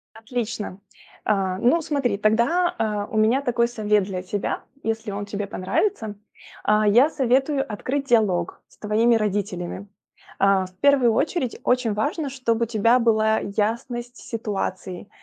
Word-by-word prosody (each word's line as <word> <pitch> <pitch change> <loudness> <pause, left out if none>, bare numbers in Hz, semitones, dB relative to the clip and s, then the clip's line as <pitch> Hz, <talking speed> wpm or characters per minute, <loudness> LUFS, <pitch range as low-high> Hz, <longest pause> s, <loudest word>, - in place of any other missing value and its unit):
Отлично. 220 -4 -4 0.5
А. 195 -3 +1
Ну 250 - +3
смотри, 280 -9 -1
тогда, 235 - +2
а, 210 -2 -1
у 220 - -2
меня 225 +5 +3
такой 235 -3 +1
совет 210 -3 +1
для 185 -2 -4
тебя, 200 +2 -3 0.2
если 225 -1 -2
он 200 +1 -4
тебе 205 0 -4
понравится. 215 - -1 0.5
А, 210 0 +3
я 240 +8 +6
советую 270 0 +1
открыть 275 +6 -2
диалог 200 -8 +1
с - - -25
твоими 220 +3 +2
родителями. 200 -3 -2 0.5
А, 195 -1 +3
в 185 - -21
первую 265 -2 +4
очередь 260 +1 -1
очень 250 -3 +2
важно, 285 +8 -1
чтоб 245 -4 -1
у - - +3
тебя 230 +2 +3
была 220 -2 +3
ясность 235 +4 -3
ситуации, 195 -4 -4
220 Hz, 140 wpm, -23 LUFS, 205-245 Hz, 0.5 s, я